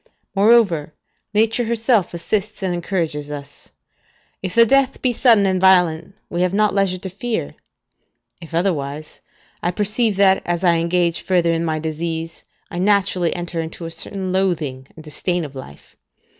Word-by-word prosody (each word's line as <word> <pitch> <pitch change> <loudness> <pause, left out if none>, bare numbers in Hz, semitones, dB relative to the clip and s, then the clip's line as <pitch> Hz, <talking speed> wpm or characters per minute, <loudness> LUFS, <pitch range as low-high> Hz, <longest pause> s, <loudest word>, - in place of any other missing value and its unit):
Moreover, 195 -8 +3 0.4
Nature 225 +3 +2
herself 230 -3 +1
assists 205 +4 -3
and 185 -2 0
encourages 165 -5 -2
us: 145 -1 -9 0.7
if 185 -2 -4
the 230 0 +7
death 270 +2 +2
be 250 -2 +1
sudden 230 -4 +4
and 185 -1 +1
violent, 180 -1 +3
we 175 - -3
have 180 +1 +1
not 210 0 +2
leisure 195 -2 +1
to 185 - -7
fear; 225 +4 -3 0.9
if 165 - -11
otherwise, 155 -4 -2 0.4
I 175 - 0
perceive 210 +3 +1
that 190 -1 +4
as 175 +1 -2
I 170 -2 +4
engage 170 0 0
further 175 -3 +1
in 165 0 -1
my 160 -1 -1
disease, 160 +1 -4 0.3
I 175 - -4
naturally 190 -3 +1
enter 175 -1 -3
into 165 +1 -7
a 165 - -6
certain 190 +2 -4
loathing 160 -9 -1
and 160 - -12
disdain 170 +3 -2
of 145 - -10
life. 130 - -12
180 Hz, 155 wpm, -20 LUFS, 165-200 Hz, 0.9 s, the